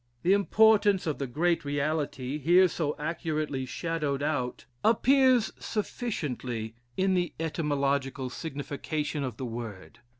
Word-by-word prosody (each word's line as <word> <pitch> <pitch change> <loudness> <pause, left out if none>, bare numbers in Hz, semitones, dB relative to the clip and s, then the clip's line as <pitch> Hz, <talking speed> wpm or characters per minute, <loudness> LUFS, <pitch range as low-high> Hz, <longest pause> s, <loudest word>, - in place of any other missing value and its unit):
The 185 - +5
importance 205 -1 +4
of 155 -3 -2
the 140 - -2
great 165 +6 +1
reality, 145 -1 -2
here 175 +6 +6
so 155 -3 -2
accurately 150 -4 -2
shadowed 150 -2 -2
out, 140 -6 -2 0.2
appears 255 0 +4
sufficiently 130 - -3 0.2
in 190 0 +2
the 180 -1 0
etymological 140 -4 -1
signification 145 0 -3
of 125 -5 -4
the 130 - -4
word. 115 -2 -7
150 Hz, 120 wpm, -28 LUFS, 135-175 Hz, 0.2 s, here